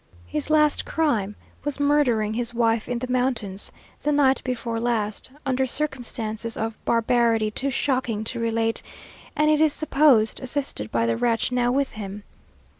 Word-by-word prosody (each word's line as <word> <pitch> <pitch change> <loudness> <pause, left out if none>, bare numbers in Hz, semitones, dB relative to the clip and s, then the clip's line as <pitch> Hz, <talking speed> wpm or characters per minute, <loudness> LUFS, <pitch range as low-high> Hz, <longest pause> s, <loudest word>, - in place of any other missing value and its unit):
His 95 +13 -3
last 300 -1 +3
crime 225 -11 0 0.3
was 290 -1 -1
murdering 265 -7 +2
his 240 +1 -3
wife 230 -1 +1
in 245 - -1
the 255 +2 -4
mountains, 240 -6 -1 0.3
the 295 - +1
night 275 -2 +3
before 230 -2 -3
last, 225 -3 -1 0.2
under 265 0 +1
circumstances 235 -5 -2
of 225 0 -2
barbarity 230 -2 +2
too 270 +5 -1
shocking 255 -5 -1
to 235 +2 -3
relate, 225 0 0 0.5
and 305 +1 +3
it 305 0 +3
is 310 -2 +4
supposed, 275 -8 +3
assisted 260 - -3
by 115 0 +1
the 115 0 0
wretch 230 - +1
now 245 -1 +2
with 275 +1 0
him. 205 -1 -7
240 Hz, 155 wpm, -24 LUFS, 220-270 Hz, 0.5 s, is